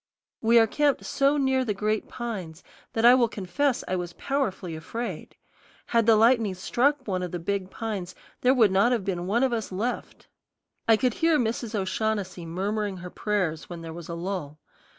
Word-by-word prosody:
We 230 +1 +5
are 225 - +7
camped 290 +5 +1
so 280 +2 +2
near 265 -2 +2
the 215 -5 -2
great 215 +2 -1
pines 190 -9 -6 0.3
that 225 +1 +1
I 240 - +9
will 250 -2 +4
confess 230 +7 -1
I 185 - 0
was 175 -1 -4
powerfully 200 - -2
afraid. 190 +4 -6 0.5
Had 230 -1 +1
the 225 - +7
lightning 225 -3 +4
struck 260 +8 +1
one 185 -2 -1
of 180 - -3
the 175 - -4
big 190 +2 -2
pines 200 -5 -5 0.3
there 255 +2 +4
would 220 -6 +5
not 195 +6 +4
have 220 -6 -1
been 180 -2 -2
one 235 +6 +2
of 260 -2 +2
us 225 -4 -3
left. 220 +7 -4 0.6
I 225 -1 +6
could 250 0 +1
hear 325 +2 +3
Mrs. 230 -2 -2
O'Shaughnessy 195 -2 -2
murmuring 200 +3 -2
her 180 0 -8
prayers 185 -7 -2
when 170 -2 -7
there 165 -1 -7
was 170 0 -9
a 170 - -3
lull. 170 -4 -4
210 Hz, 190 wpm, -26 LUFS, 185-240 Hz, 0.6 s, I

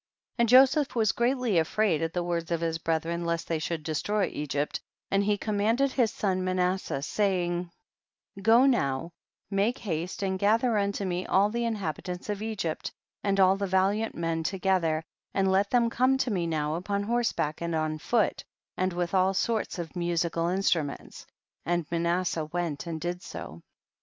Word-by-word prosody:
35. - - +4
And 235 - +3
Joseph 270 +3 +5
was 220 -4 +3
greatly 240 -5 +1
afraid 165 0 +1
at 165 0 -1
the 175 +1 -1
words 170 -1 -2
of 170 -1 0
his 165 -1 -1
brethren 165 +1 -1
lest 170 0 -2
they 165 -2 -1
should 155 0 -3
destroy 195 +7 0
Egypt, 145 0 -2 0.3
and 195 0 +3
he 205 0 +1
com 210 0 -2
manded 235 +6 +2
his 245 -4 +2
son 185 -2 -1
Manasseh, 185 -5 -1
saying, 180 -2 0 0.7
go 230 +5 +6
now 165 - +1 0.4
make 200 +5 +1
haste 180 0 -3
and 190 -1 -1
gather 225 +4 +3
unto 200 -1 0
me 180 0 -2
all 200 +2 +3
the 235 +1 -1
inhabitants 185 -4 -4
of 205 -1 -2
Egypt 210 -8 -3 0.3
and 195 -1 +1
all 190 0 +6
the 200 0 -2
valiant 195 +4 +1
men 165 -1 -1
together, 180 -3 0 0.3
and 195 -1 +2
let 195 +1 +2
them 240 -2 +3
come 255 +3 +2
to 260 -2 0
me 175 -4 0
now 155 -2 -1
upon 200 +4 -2
horse 235 +2 +1
back 150 +1 -2
and 170 -1 -1
on 155 0 -1
foot 220 +5 +1 0.3
and 185 0 0
with 175 0 -2
all 190 0 +3
sorts 220 +3 0
q/" 170 -3 -4
musical 170 -1 0
instruments, 175 -6 -1 0.4
and 175 +1 0
Manas 170 +1 +1
seh 165 - -2
went 160 0 -3
and 165 -1 -3
did 175 +2 -3
so. 85 - -8
185 Hz, 175 wpm, -28 LUFS, 165-210 Hz, 0.7 s, go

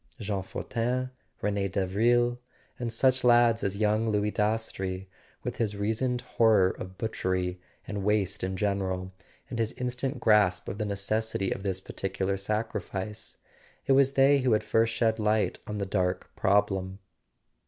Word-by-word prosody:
Jean 100 -3 -2
Fortin, 125 +6 -2 0.3
Rene 100 -1 0
Davril, 120 +6 +2 0.4
and 120 -2 -2
such 130 +3 +2
lads 120 -2 +5
as 100 0 -1
young 110 +1 +2
Louis 105 0 +1
Dastrey, 100 -4 -1 0.4
with - - -4
his 105 -3 -1
reasoned 115 +4 0
horror 105 -5 +3
of 95 0 -9
butchery 90 -5 -2 0.3
and 100 -2 -4
waste 105 -1 0
in 95 0 -2
general, 95 -2 -1 0.4
and 120 - -3
his 115 0 0
in¬ 125 0 -3
stant 130 +3 -3
grasp 105 -5 +3
of 100 - -5
the 105 - 0
necessity 100 0 -1
of - - -3
this 95 -2 -2
particular 95 +1 -2
sacrifice: 105 0 -4 0.5
it - - +1
was 135 0 +5
they 140 +1 +5
who 130 -3 +2
had 105 0 +2
first 115 +1 +2
shed 115 -1 +1
light 105 0 +1
on 105 - -4
the 100 - -1
dark 90 -2 -1
prob¬ 105 +1 +3
lem. 95 0 -4
105 Hz, 155 wpm, -28 LUFS, 95-115 Hz, 0.5 s, lads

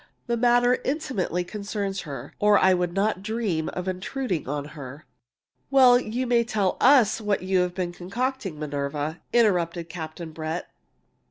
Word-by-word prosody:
The 235 - 0
matter 245 +1 +3
intimately 260 - -1
concerns 200 0 -4
her, 135 -1 -7
or 210 0 +5
I 190 - +5
would 180 -1 0
not 195 +1 0
dream 210 -7 -2
of 180 0 -4
intruding 185 - -3
on 145 0 -3
her." 140 0 -9 0.6
"Well, 255 -3 +7
you 245 +2 -3
may 240 -1 +3
as 235 -1 -3
well 195 -3 +2
tell - - -20
us 245 -5 +5
what 205 -3 0
you've 180 -1 +1
been 180 -2 -2
concocting, 200 - -3
Minerva," 145 +2 -3
interrupted 175 -7 +2
Captain 160 0 -7
Brett. 160 +2 -5
190 Hz, 155 wpm, -25 LUFS, 165-235 Hz, 0.6 s, Well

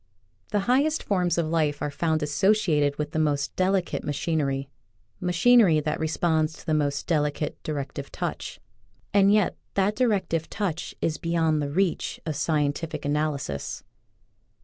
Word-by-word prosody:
The 205 -2 +1
highest 280 +8 +2
forms 180 -4 +1
of 170 - +2
life 155 -2 0
are 145 - -2
found 160 +1 0
asso 190 +8 +3
ciated 150 -9 +1
with 150 - -3
the 155 - -1
most 145 -2 0
delicate 185 -1 0
machinery 140 -2 -1 0.3
— 95 - -41
machinery 185 -2 +5
that 150 +1 -2
responds 160 0 +1
to - - -14
the 155 - 0
most 145 -2 0
delicate 150 -2 -1
directive 140 -3 -5
touch, - - -4 0.5
and 200 0 +5
yet 210 -3 +2 0.2
that 200 +2 +2
directive 190 -10 0
touch 180 -6 -3
is 160 - -1
beyond 165 -3 +1
the 145 - -2
reach 180 +3 0
of 155 -2 -2
scientific 150 +1 -1
analysis. 145 - -2
160 Hz, 150 wpm, -26 LUFS, 150-185 Hz, 0.5 s, machinery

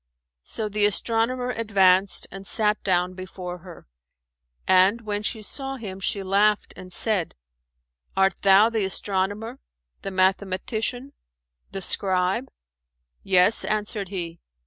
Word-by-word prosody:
So 215 - -5
the 210 0 +2
astronomer 235 +4 0
advanced 195 -4 +2
and 195 0 -9
sat 210 -1 +1
down 180 -1 +1
before 185 -1 -8
her; 175 -1 -13 0.8
and, 190 +5 +4
when 210 -2 -3
she 215 +1 -2
saw 270 +4 -4
him, 200 -7 -7
she 195 +1 -1
laughed 205 +2 +2
and 185 0 -11
said, 195 -2 -1 0.8
"Art 195 0 +4
thou 200 +3 +6
the 220 -3 0
astronomer, 195 +2 -1 0.4
the - - -4
mathematician, 200 +7 -1 0.6
the 195 -1 -5
scribe?" 190 +8 0 0.7
"Yes," 185 +3 +4
answered 210 -2 -2
he. 170 -4 -5
195 Hz, 120 wpm, -24 LUFS, 185-215 Hz, 0.8 s, thou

